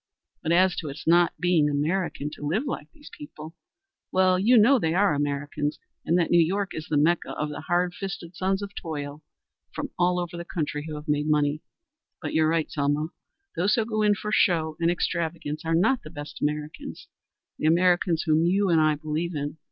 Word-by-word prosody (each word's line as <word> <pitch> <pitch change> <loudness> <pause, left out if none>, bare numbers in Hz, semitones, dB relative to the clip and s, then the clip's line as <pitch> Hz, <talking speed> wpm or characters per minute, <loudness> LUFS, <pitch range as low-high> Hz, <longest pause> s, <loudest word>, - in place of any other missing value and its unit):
But 160 - -1
as 185 +1 +4
to 155 - -4
its 140 +3 -8
not 170 +1 +4
being 170 -4 +3
American 150 0 -1
to - - -11
live 185 - 0
like 265 - -5
these 295 -2 -15
people 160 - -10 0.6
well 185 0 +3
you 235 +6 +5
know 245 +5 +6
they 160 -4 0
are 200 -3 +3
Americans 145 +1 -2 0.3
and 170 - +2
that 170 - +1
New 170 -1 +6
York 195 +4 -1
is 155 - -6
the 150 - +1
Mecca 165 +4 +2
of 150 - -3
the 145 0 -6
hard 175 +2 0
fisted 190 -3 -6
sons 190 +2 0
of 200 0 -7
toil 145 -4 -6 0.5
from - - -5
all 180 0 +2
over 175 -1 -4
the 170 - -5
country 150 -3 -3
who 155 - -5
have 150 +1 -8
made 150 0 0
money. 150 0 +1 0.6
But 150 - -5
you're 160 0 +3
right, 165 -1 0
Selma. 145 +2 0 0.5
Those 190 +5 +2
who 225 - +1
go 215 -1 -1
in 210 -1 +4
for 210 +1 -5
show 160 -6 +2
and 170 0 +2
extravagance 165 -3 -2
are 165 0 +1
not 240 +10 +3
the - - -10
best 145 -2 -9
Americans 150 +1 -4 0.5
the 155 - +1
Americans 175 0 +3
whom 155 0 +3
you 190 +3 +2
and 165 -2 +4
I 155 -1 +3
believe 155 +3 -3
in. 145 +2 -4
165 Hz, 200 wpm, -26 LUFS, 150-185 Hz, 0.6 s, know